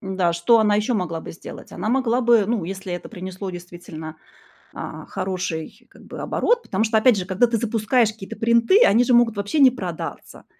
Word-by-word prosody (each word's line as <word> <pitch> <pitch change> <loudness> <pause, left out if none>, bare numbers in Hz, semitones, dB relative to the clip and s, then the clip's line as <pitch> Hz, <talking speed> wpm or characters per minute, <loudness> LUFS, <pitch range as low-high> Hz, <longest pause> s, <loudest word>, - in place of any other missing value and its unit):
М-да 190 -3 -1
что 170 +8 +3
она 210 -1 +3
ещё 215 +4 0
могла 170 -5 -2
бы - - -9
сделать, 165 - -11
она - - -4
могла 250 0 +1
бы, 235 -3 +4
ну 225 -5 -1
если 190 +1 -6
это 175 - -6
принесло 190 -1 -7
действительно, 175 -3 -9 0.6
а, - - -7
хороший 185 +4 -5
как - - -18
бы - - -9
оборот, 475 0 +1
потому 195 +3 -1
что, 220 0 +1
опять 220 0 +4
же, 185 - -3
когда 195 +5 +2
ты 230 0 -1
запускаешь 225 0 +1
какие-то 205 -3 -10
принты, 235 - +4
они 230 +4 +4
же 250 - +2
могут 230 -3 +3
вообще 200 +9 -2
не 265 -2 +7
продаться, 180 -9 -7
210 Hz, 200 wpm, -22 LUFS, 185-235 Hz, 0.6 s, не